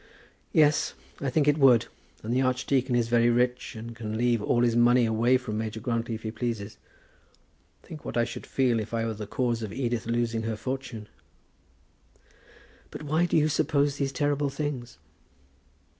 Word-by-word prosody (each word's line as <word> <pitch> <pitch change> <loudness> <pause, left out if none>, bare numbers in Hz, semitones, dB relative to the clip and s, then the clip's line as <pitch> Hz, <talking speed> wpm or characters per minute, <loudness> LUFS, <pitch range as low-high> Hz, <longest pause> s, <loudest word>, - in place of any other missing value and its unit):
"Yes; 150 -1 +3 0.2
I 140 - -1
think 145 +2 +1
it 150 +1 +3
would. 125 -5 +6 0.4
And 115 +2 -2
the 130 - +2
archdeacon 130 0 +1
is 120 -1 +2
very 120 0 +3
rich, 125 +1 0
and 115 +1 -8
can 110 -2 -4
leave 120 -1 +2
all 120 +3 +2
his 120 -1 +2
money 120 +1 +5
away 115 +3 +3
from 110 -4 -4
Major 110 0 -4
Grantly 115 0 -2
if 110 - -9
he 110 - -3
pleases. 110 -2 -4 1.0
Think 155 -2 -10
what - - -4
I 120 - +4
should 115 - -6
feel 125 -4 +1
if 110 +2 -4
I 115 0 0
were 115 - -2
the 105 -1 -7
cause 120 0 -1
of 110 -3 -5
Edith 120 -4 -2
losing 115 -1 0
her 110 0 -2
fortune!" 130 -2 -5 1.8
"But - - -8
why 155 +4 +1
do - - +2
you 155 -1 +4
suppose 145 -1 +1
these 140 -2 -1
terrible 145 +1 0
things?" 135 -4 -4
120 Hz, 175 wpm, -27 LUFS, 115-135 Hz, 1.8 s, would